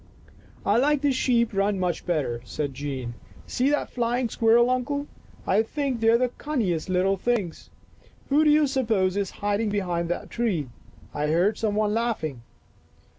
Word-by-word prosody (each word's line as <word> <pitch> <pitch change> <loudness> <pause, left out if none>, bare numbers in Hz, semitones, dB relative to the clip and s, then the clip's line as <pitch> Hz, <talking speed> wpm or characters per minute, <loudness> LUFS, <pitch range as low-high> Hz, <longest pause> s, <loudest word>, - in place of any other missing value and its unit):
" - - -26
I 205 +2 +3
like 290 +3 +2
the 290 -1 +2
sheep 240 -3 +1
run 200 0 +1
much 180 -3 -2
better," 140 -9 -1
said 145 -3 -4
Jean. 130 -3 -5 0.2
" - - -21
See 255 +3 +2
that 295 - 0
flying 240 0 0
squirrel, 235 +3 +4
Uncle! 285 +3 -1 0.4
I 200 +3 +3
think 265 +1 -2
they 225 0 +3
are 230 - +6
the 250 +1 +1
cunningest 210 - -1
little 185 +2 +2
things. 205 -5 -2 0.6
Who 290 +2 +4
do 305 - +4
you 300 0 +5
suppose 225 -9 +1
is 200 -2 -1
hiding 205 +1 -1
behind 175 -4 -1
that 175 - -4
tree? 190 - -1 0.4
I 150 0 -1
heard 175 +7 +2
some 215 -2 0
one 210 0 +1
laughing." 215 - -2
215 Hz, 175 wpm, -25 LUFS, 180-250 Hz, 0.6 s, are